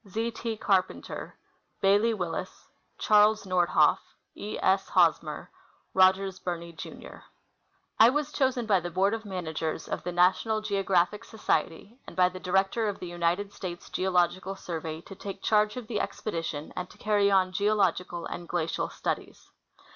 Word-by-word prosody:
Z. 225 +4 -2
T. 225 -1 -4
Carpenter. 190 -3 -1 0.4
Bailey 205 +4 +4
Willis. 175 -5 -5 0.3
Charles 215 0 +4
Nordhoff. 175 -5 +3 0.3
E. 210 - -6
S. 195 +1 +2
Hosmer.. - - +2 0.4
Rogers 190 0 +3
Birnie, 170 -1 -5
Jr. 160 - -9 0.8
I 225 - +9
was 295 +2 -1
chosen 260 -3 +1
by 200 -4 +3
the 175 0 -5
Board 195 +4 +2
of 225 -1 -4
Managers 165 -5 -4
of - - -3
the 180 - -4
National 185 +5 +3
Geo 205 -2 -1
graphic 190 +1 +1
Society 210 - -2
and - - -10
by 180 -1 +4
the 185 0 -9
Director 195 +4 +1
of 200 - -4
the - - -7
United 175 +4 -1
States 175 -2 -7
Geological 185 +1 +1
Survey 160 -4 -5
to 195 - -11
take 195 +1 -8
charge 215 +2 +2
of 250 - -5
the 215 -2 -2
expedition 165 -6 -4
and 180 0 -4
to - - -17
carry 205 -1 +2
on 190 -2 +3
geological 185 -4 0
and 175 - -7
glacial 170 -2 -1
studies. - - -5
190 Hz, 155 wpm, -28 LUFS, 175-210 Hz, 0.8 s, I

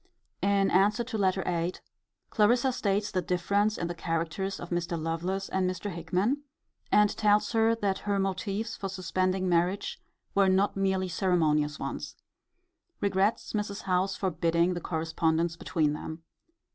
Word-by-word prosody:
In 200 -1 +2
answer 205 +5 +3
to 235 -1 -4
Letter 190 -1 +2
VIII. 175 0 0 0.6
Clarissa 240 +4 +3
states 205 -3 0
the 185 - 0
difference 200 +5 +1
in - - -2
the 175 - -3
characters 165 +3 -2
of 175 - -8
Mr. 175 -1 -1
Lovelace 175 +5 -2
and 185 -1 0
Mr. 185 +3 -4
Hickman; 185 - 0 0.5
and 210 0 +4
tells 210 0 +3
her, 225 0 +3
that 200 -4 -1
her 200 - +2
motives 195 +4 -2
for 195 - -4
suspending 185 0 -1
marriage 175 +3 0 0.3
were 195 -1 +4
not 190 +2 +2
merely 190 -1 +1
ceremonious 155 -5 +1
ones. - - -5 0.8
Regrets 200 +2 +1
Mrs. 205 -1 -3
Howe's 190 +1 +1
forbidding 170 -1 +1
the 175 - -4
correspondence 165 0 0
between 155 -3 0
them. 160 +2 -7
190 Hz, 145 wpm, -29 LUFS, 170-200 Hz, 0.8 s, and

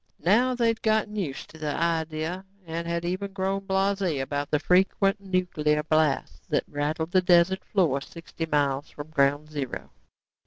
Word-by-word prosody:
Now 245 +7 +4
they 240 -1 +1
had 225 -1 -2
gotten 215 -1 +1
used 165 -10 -4
to 160 - -14
the 150 -2 -2
idea 165 +1 -1 0.2
and 165 +1 -4
had 170 0 -2
even 190 +3 -3
grown 195 0 -1
blasé 190 -5 +1
about 145 +2 -2
the 150 - +2
frequent 195 +5 +2
nuclear 175 -6 0
blasts 155 -2 0
that - - +1
rattled 155 +3 -2
the 185 - +4
desert 180 +1 +4
floor 160 -9 +1
sixty 165 +1 -7
miles 145 -2 0
from 150 +1 -9
ground 145 +1 +1
zero. 140 -4 -5
170 Hz, 160 wpm, -26 LUFS, 150-190 Hz, 0.2 s, Now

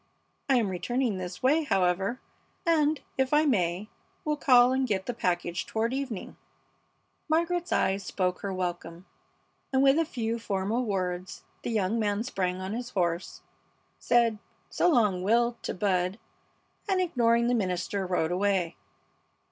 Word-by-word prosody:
I 270 - +5
am 225 -5 +2
returning 230 +3 -1
this 180 +3 -7
way, 295 +5 +4
however, 195 - +1 0.5
and, 310 -3 +3 0.2
if 265 +2 +2
I 305 +1 +4
may, 190 - +1 0.4
will 300 -1 +1
call 250 -4 +5
and 260 0 +1
get 190 -4 -1
the 245 - -2
package 175 -4 -1
toward 225 +2 -1
evening." 265 -7 -4 0.9
Margaret's 340 +2 0
eyes 195 +1 +1
spoke 180 -1 -1
her 200 - -3
welcome, 175 -1 -4 0.7
and 265 0 +3
with 275 +3 +5
a 330 - +2
few 230 -5 -3
formal 210 +3 -1
words 185 -3 -3 0.2
the - - -4
young 220 0 0
man 205 0 0
sprang 185 -6 -2
on 190 +2 -4
his 240 +1 -4
horse, 175 -4 -2 0.6
said, 235 -3 +2 0.3
"So 355 - +3
long, 210 - +3
Will!" 235 +4 +2
to - - -3
Bud, 185 0 0 0.7
and, 380 -1 +2
ignoring 235 -9 +2
the 245 - +2
minister, 190 -2 -1
rode 175 -2 0
away. 185 -2 0
215 Hz, 150 wpm, -28 LUFS, 185-255 Hz, 0.9 s, I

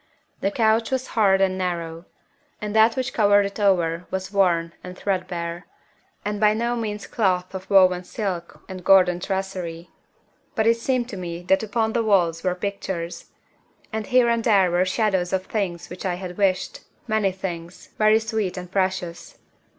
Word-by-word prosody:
The 195 - +1
couch 220 +1 +2
was 260 -1 -2
hard 195 -4 +4
and 190 -1 +1
narrow, 170 -2 -3 0.5
and 210 0 -4
that 220 +1 +5
which 260 0 -2
covered 205 -2 +4
it 200 +2 -6
over 175 -4 +1
was 190 0 -4
worn 170 -4 +2
and 180 0 -9
threadbare, 175 -2 -3 0.6
and 210 0 -2
by 210 0 +4
no 235 +2 0
means 210 -3 -4
cloth 185 -5 0
of 190 0 -7
woven 185 -2 +5
silk 180 -4 -5
and 185 -1 -8
golden 185 -2 +5
tracery. 185 -3 -4 0.6
But 220 - +1
it 230 0 +4
seemed 245 0 0
to 200 - -6
me 175 -1 -6
that 190 +2 +3
upon 220 +1 -1
the 235 - +1
walls 175 -7 +2
were 180 -1 0
pictures. 185 -3 -4 0.7
And 220 -2 -3
here 250 -1 +4
and 235 -1 +1
there 195 -6 +4
were 175 +1 +2
shadows 190 -2 0
of 190 0 0
things 190 -6 -3
which 180 - -7
I 185 -2 -1
had 180 -1 -7
wished 190 -2 0 0.3
many 215 -3 +1
things, 175 -2 -7
very 215 0 +5
sweet 220 -4 -2
and 180 -1 -7
precious. 185 -3 -2
190 Hz, 170 wpm, -23 LUFS, 180-215 Hz, 0.7 s, that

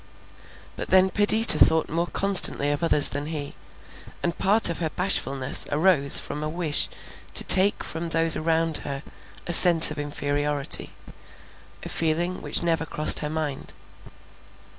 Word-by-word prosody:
But - - -8
then 190 0 +1
Perdita 210 +4 +5
thought 160 0 +1
more 170 +2 -5
constantly 190 -8 +1
of 145 - -6
others 150 -3 +2
than 145 +1 -8
he; 150 -3 -7 0.7
and 170 -1 -4
part 210 +4 +3
of 170 - -5
her 165 -2 -4
bashfulness 140 -8 -1
arose 150 -3 +4
from 150 - -9
a 155 - -6
wish 160 -2 -2 0.5
to - - 0
take 190 +2 +4
from 165 +1 -8
those 165 0 0
around 165 0 -3
her 140 0 -7 0.4
a 170 - -3
sense 165 -2 +6
of 155 - -9
inferiority; 145 0 -2 0.9
a - - -9
feeling 170 +3 -3
which - - 0
never 165 -1 -4
crossed 155 +1 +1
her 150 - -7
mind. 150 -3 -8
160 Hz, 145 wpm, -21 LUFS, 145-175 Hz, 0.9 s, sense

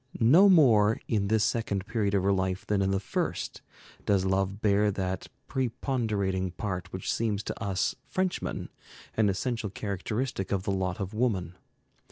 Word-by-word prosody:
No 160 - +7
more 115 - +5
in 100 -3 +1
this 110 0 +2
second 110 -4 -1
period 105 -2 0
of 95 - +2
her 100 +1 +3
life 95 0 -1
than 100 -2 +1
in 95 - +1
the 95 0 +1
first 100 - -3 0.4
does 95 -2 +2
love 95 +1 0
bear 105 0 +3
that 95 -2 -3 0.2
preponderating 110 -7 -1
part 90 0 -4
which 95 - -2
seems 105 -3 -1
to - - -5
us 100 -2 0
Frenchmen 185 -1 -2 0.5
an 110 -2 +3
essential 115 +2 -2
characteristic 100 +2 -3
of 95 -2 0
the 100 - -1
lot 95 -1 -1
of 100 0 -4
woman. 100 -7 0
100 Hz, 160 wpm, -28 LUFS, 95-115 Hz, 0.5 s, No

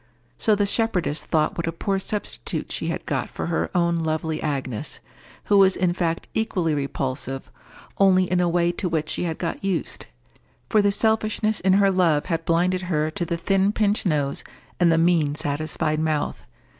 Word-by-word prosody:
So 215 - +2
the 205 0 +1
shepherdess 195 -8 0
thought 155 -1 0
what 170 - -3
a - - 0
poor 195 +3 -1
substitute 210 +2 -4
she - - -2
had - - -3
got - - -2
for - - -5
her - - -1
own 170 -1 +2
lovely 160 0 -2
Agnes—who 135 - -4
was 195 -1 +6
in 180 -2 +1
fact 170 -2 -2
equally 185 -8 0
repulsive, 135 -2 -3 0.5
only 190 -1 +5
in 180 0 0
a 175 -1 +2
way 170 0 +2
to 180 +1 -3
which 155 -2 -1
she - - -1
had 160 -2 -3
got 170 +1 -4
used; 190 -4 -2 0.6
for 215 - +5
the 205 0 +3
selfishness 220 0 +1
in 190 0 +3
her 195 0 +4
love 170 -6 +2
had 165 -3 -2
blinded 180 +2 +2
her 155 -2 0
to 175 - -3
the 170 0 -2
thin 195 +3 +2
pinched 210 -1 +1
nose 145 -4 0 0.4
and 175 -2 +5
the 165 - +3
mean 165 -3 +3
self 145 - -1
satisfied 155 0 -1
mouth. 155 - -1
170 Hz, 180 wpm, -23 LUFS, 155-195 Hz, 0.6 s, was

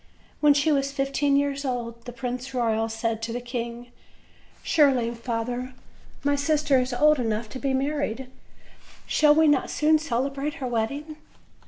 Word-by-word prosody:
When 295 -1 +5
she 295 +2 +2
was 275 -1 +1
fifteen 275 0 +1
years 280 0 0
old 235 -3 -4
the 245 - -6
Prince 250 +1 -4
Eoyal 225 -2 +1
said 225 0 -2
to 225 0 -3
the 240 - -3
king: 240 0 -6 0.7
"Surely, 265 -7 +3
father, 245 +2 -4 0.5
my 285 0 +2
sister 290 -1 +2
is 255 +1 -1
old 300 +4 +4
enough 220 -1 -1
to 260 - -7
be 270 -1 0
married; 270 -3 -2 0.8
shall 300 -1 +4
we 320 0 +5
not 290 -3 +2
soon 310 +1 +3
celebrate 275 +1 -2
her 275 - -5
wedding?" 280 +6 -3
265 Hz, 155 wpm, -25 LUFS, 235-285 Hz, 0.8 s, When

